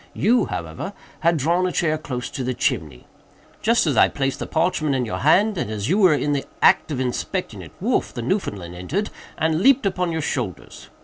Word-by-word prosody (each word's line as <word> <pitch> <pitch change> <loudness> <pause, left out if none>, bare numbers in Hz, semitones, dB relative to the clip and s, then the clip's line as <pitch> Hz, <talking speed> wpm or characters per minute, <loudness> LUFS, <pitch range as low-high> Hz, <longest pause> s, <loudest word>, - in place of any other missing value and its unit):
You, 240 +4 +3
however, 80 -2 -5 0.3
had 170 0 +2
drawn 170 +6 +1
a - - -2
chair 155 -3 +1
close 130 -5 -5
to 130 - -4
the 125 0 -2
chimney. 80 - -2 0.6
Just 230 -1 +3
as 145 -5 +1
I - - +7
placed 135 -1 -2
the - - -4
parchment 160 -3 0
in 125 -2 0
your 110 - -4
hand, 195 +6 +3
and - - -2
as 110 +2 -3
you 190 +5 +2
were 185 -7 +6
in 145 +1 0
the 140 - -1 0.2
act - - +4
of 145 -4 -3
inspecting 125 -2 -3
it, - - -11
Wolf, - - 0
the 120 - -5
Newfoundland, 105 - -2
entered, 145 - -3 0.3
and 160 +1 +1
leaped 270 +1 +5
upon 180 -3 0
your 160 -1 -2
shoulders. 120 -11 -5
150 Hz, 205 wpm, -22 LUFS, 125-180 Hz, 0.6 s, I